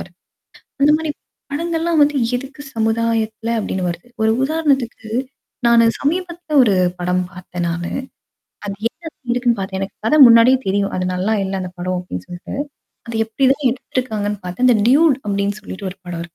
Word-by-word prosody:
வருது. - - -11 0.7
அது 290 - +6
மாரி 315 -1 -4 0.4
படங்கள்ல்லாம் 330 +1 0
வந்து 290 0 +4 0.2
எதுக்கு 270 +4 -7
சமுதாயத்தல 225 0 0
அப்டின்னு 190 -3 -2
வருது. 170 +7 -7
ஒரு 220 0 +4
உதாரணத்துக்கு, 275 -7 0 0.6
நானு 235 -1 +6
சமீபத்தில 340 0 -1
ஒரு 205 -5 +3 0.2
படம் 180 +1 0
பார்த்தேன் 175 -1 -5
நானு. 170 +1 -3 0.7
அது 200 - -4
என்னது 310 -5 -8
இருக்குன்னு 245 -2 +1
பாார்த்தேன். 190 0 -3
எனக்கு 195 - -5
கதை 305 +7 +4
முன்னாடியே 235 +3 +7
தெரியும். 200 +1 0
அது 185 - -1
நல்லா 195 +5 0
இல்ல 195 - -3
அந்த 180 -1 -6
படம் 185 0 -1
அப்டின்னு 90 - -7
சொல்ட்டு. 175 0 -8 0.6
அ - - -4
எப்டி 225 +5 0
தான் 275 -1 -2
எடுத்திருக்காங்கன்னு 215 -5 -3
பார்த்தா 180 +8 0
அந்த 245 -3 +6
டியூட் 290 0 +5
அப்டின்னு 200 +1 -1
சொல்லிட்டு 195 -1 -6
ஒரு 185 - -12
படம் 175 - -6
இருக்கு. 170 - -4
225 Hz, 160 wpm, -19 LUFS, 190-275 Hz, 0.7 s, முன்னாடியே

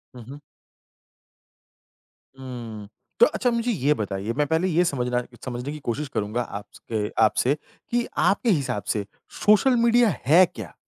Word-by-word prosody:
हुँ, 120 - -10
हुँ। 145 +1 -9 2.0
हुँ, 115 -5 -8 0.3
तो 475 - +9
अच्छा 250 - 0
मुझे 235 +1 0
ये 150 - +2
बताइए, 105 -1 -3
मैं 145 +2 0
पहले 160 +4 +1
ये 175 0 +3
समझना 125 -4 -1 0.2
समझने 125 +3 -4
की 150 - -7
कोशिश 140 +3 -3
करूँगा 110 +4 -1
आपस 100 -3 -8
अ, 105 -2 -1
आपसे 125 +6 +2 0.4
कि 240 0 +1
आपके 225 +4 +2
हिसाब 140 - 0
से 105 -2 -3 0.4
सोशल 215 +5 +5
मीडिया 235 -1 +5 0.2
है 170 +7 +7
क्या? 105 -7 -8
135 Hz, 150 wpm, -24 LUFS, 115-185 Hz, 2.0 s, तो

